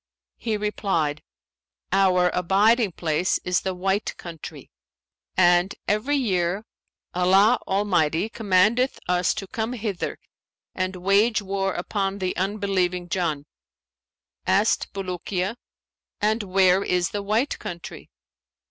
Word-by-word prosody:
He 220 -2 -2
replied, 190 -8 -1 0.7
'Our 185 -2 +3
abiding 200 +4 +3
place 165 +2 0
is 180 -1 +1
the 190 -1 -3
White 195 +3 -1
Country; 165 -3 -9 0.7
and, 175 +1 +4
every 215 +8 +1
year, 195 -4 0 0.5
Allah 195 +6 +4
Almighty 190 -3 +1
commandeth 220 +4 +2
us 180 0 +2
to 195 - -4
come 225 +3 -3
hither 210 -6 -3 0.6
and 185 0 -2
wage 200 +4 +2
war 195 -1 -1
upon 195 +2 -2
the 185 -2 -2
unbelieving 185 -3 -1
Jann.' 160 -6 -1 1.0
Asked 195 +4 +2
Bulukiya, 185 +1 -3 0.6
'And 215 +2 +1
where 190 -1 +3
is 180 0 0
the 205 - -2
White 215 +7 0
Country?' 170 -1 -8
195 Hz, 110 wpm, -24 LUFS, 180-210 Hz, 1.0 s, and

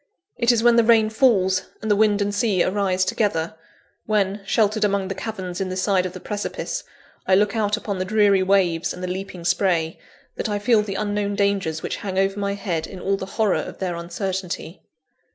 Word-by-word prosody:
It 235 +1 +3
is 230 -1 +1
when 240 -1 +5
the 235 - +6
rain 220 -1 +4
falls, 195 -6 +2
and 215 - 0
wind 205 -1 +3
and 200 0 -2
sea 200 -3 +2
arise 185 -1 +1
together 180 -5 0 0.5
when, 205 -1 +1
sheltered 215 0 +2
among 200 -2 +1
the - - -1
caverns 190 -2 -5
in 190 - -2
the 185 - -4
side 185 -1 +1
of 180 - -10
the - - -8
precipice, 210 -1 -4 0.4
I 190 - +5
look 205 +2 +2
out 210 -1 +1
upon 200 -3 -4
the - - 0
dreary 205 -1 +3
waves 185 -3 +1
and 180 - -8
the - - -2
leaping 185 -1 -6
spray 175 -3 +1 0.4
that - - -2
I 205 - 0
feel 215 +1 +3
the 200 -2 -5
unknown 205 -1 -1
dangers 200 -6 0
which - - -3
hang 190 -2 -5
over 195 +1 +1
my 200 0 -1
head 180 -5 -3
in 185 - -9
all 195 +2 0
the 190 -1 -6
horror 215 -4 +2
of - - -8
their 180 -2 -2
uncertainty. 180 0 -4
195 Hz, 205 wpm, -22 LUFS, 185-210 Hz, 0.5 s, the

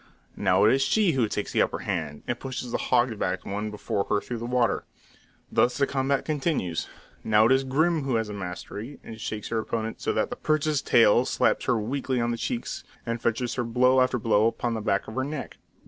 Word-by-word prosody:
Now 95 -1 +3
it 110 - +6
is 135 - +2
she 190 +7 +3
who 125 -6 +1
takes 105 0 -3
the - - +2
upper - - +1
hand, 80 -7 -3
and 120 - -3
pushes 130 -2 -5
the - - -1
hog 120 -3 +1
backed 95 - -2
one 105 +2 -3
before 105 -1 -2
her 105 - +1
through 120 +2 -6
the 120 - -4
water. 125 -1 +1 0.7
Thus 125 - +2
the 140 - +3
combat 135 0 0
continues. 145 - -1 0.4
Now 105 0 +4
it 115 - +4
is 135 0 +4
Grim 155 +5 +1
who 135 -3 -1
has 115 0 +1
the 105 - -6
mastery, 100 +6 -6
and 110 -1 -9
shakes 105 -1 -4
her 115 - 0
opponent 110 0 -3
so - - 0
that - - 0
the - - -2
perch's 155 -2 +1
tail 115 +1 +5
slaps - - +1
her 125 - +2
weakly 130 +3 -1
on 120 0 0
the 115 - -2
cheeks, 115 +1 -3 0.2
and 115 0 -3
fetches 120 +1 0
her 125 - -1
blow 125 +2 +3
after 130 0 +2
blow 110 -1 +3
upon 120 +1 -1
the 110 - -3
back 100 -2 0
of 110 - -7
her 130 - -1
neck. 145 0 -5
120 Hz, 225 wpm, -26 LUFS, 110-130 Hz, 0.7 s, it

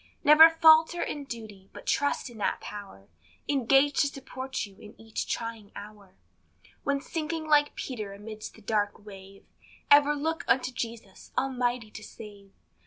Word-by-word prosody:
Never 310 +2 +9
falter 325 +1 +5
in 290 -1 -5
duty, 215 -6 -9
but - - -11
trust 285 0 0
in 225 - -13
that - - -1
power 200 - -10 0.4
Engaged 275 +1 +3
to 285 - +4
support 265 -2 -5
you 200 -2 -16
in 210 - -14
each 225 -1 -5
trying 230 -3 -5
hour; 205 -2 -12 0.7
When 280 0 0
sinking 320 +1 -4
like 295 -1 +3
Peter 215 -6 -5
amidst 215 +2 -9
the 220 - -17
dark 205 -1 -1
wave, 195 -1 -13 0.5
Ever 290 +1 +6
look 320 +3 -2
unto 255 0 +2
Jesus, 230 -5 -7
almighty 245 -4 -1
to 215 - -10
save. 205 -3 -12
235 Hz, 150 wpm, -28 LUFS, 210-285 Hz, 0.7 s, Never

